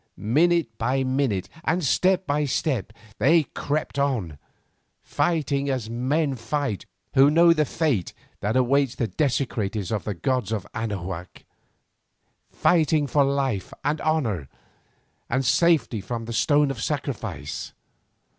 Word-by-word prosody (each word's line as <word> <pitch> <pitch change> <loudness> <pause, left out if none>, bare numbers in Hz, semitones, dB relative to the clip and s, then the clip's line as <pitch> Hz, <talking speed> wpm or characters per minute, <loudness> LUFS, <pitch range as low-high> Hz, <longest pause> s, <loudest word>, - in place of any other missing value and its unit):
Minute 155 +2 +2
by 130 +4 +1
minute 130 -7 0 0.2
and 175 +2 0
step 185 +6 +2
by 150 -1 0
step 130 -5 -1 0.3
they 155 +8 +5
crept 145 0 -3
on, 110 - -1 0.6
fighting 145 -5 0
as 125 -5 -2
men 140 +5 0
fight 115 -3 -3 0.3
who 135 +2 +6
know 170 +2 +6
the 155 -2 +1
fate 135 - 0 0.3
that 105 +3 -1
awaits 130 0 +2
the 120 - -1
desecrators 110 - -1
of 110 - -1
the 105 - -3
gods 125 +3 -1
of 105 -4 -2
Anahuac, 95 -5 -5 1.0
fighting 155 -3 +2
for 140 +1 +3
life, 135 -8 -1
and 150 +2 0
honour, 115 - 0 0.8
and 130 +2 0
safety 125 - +3
from 115 +3 -5
the 115 - -5
stone 145 +4 +3
of 120 -4 -6
sacrifice. 115 - -4
135 Hz, 125 wpm, -24 LUFS, 110-150 Hz, 1.0 s, who